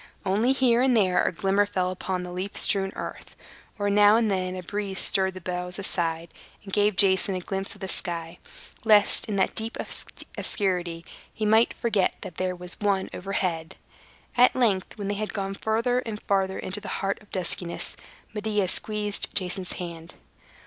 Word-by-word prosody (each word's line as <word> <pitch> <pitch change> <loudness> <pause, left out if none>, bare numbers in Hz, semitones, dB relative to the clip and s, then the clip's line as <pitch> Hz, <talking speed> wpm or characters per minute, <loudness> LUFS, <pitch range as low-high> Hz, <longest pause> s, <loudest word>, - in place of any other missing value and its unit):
Only 210 +7 +2
here 250 -3 +3
and 255 -2 +4
there 185 -4 +3
a - - +1
glimmer 195 +3 +2
fell 185 -2 -1
upon 185 0 -3
the 180 - -7
leaf 185 +3 -4
strewn 195 -2 +3
earth, - - -7 0.4
or 205 -1 -1
now 205 +1 +6
and 225 -2 +2
then 185 -1 -1
a 185 - -6
breeze 200 +1 -4
stirred 190 -1 +1
the 185 - -8
boughs 180 0 -3
aside, 170 -4 -1 0.3
and 195 -2 -10
gave 205 -1 +3
Jason 190 0 +3
a - - -1
glimpse 195 +2 -3
of - - -17
the 190 - -3
sky, 170 -2 -3 0.4
lest, 210 -2 +4
in 210 - -2
that 190 - +2
deep 225 +1 -4 0.6
obscurity, 175 -4 -1 0.3
he 215 - -3
might 220 +2 +4
forget 215 -5 +1
that 170 - -8
there 185 0 -1
was 180 0 -6
one, 200 -2 0
overhead. 180 -4 -2 0.6
At 250 +1 +5
length, 220 -5 +1
when 200 -2 -4
they 205 - 0
had 210 +1 -4
gone 195 -1 -2
farther 230 +5 +1
and 225 -4 -5
farther 190 -1 +1
into 195 +3 -4
the 210 - -8 0.2
heart 195 +2 -1
of 210 - -19
the - - -3
duskiness, 175 -1 0 0.4
Medea 210 -3 0
squeezed 210 0 0
Jason's 185 -1 0
hand. 170 -2 -7
195 Hz, 180 wpm, -26 LUFS, 180-210 Hz, 0.6 s, now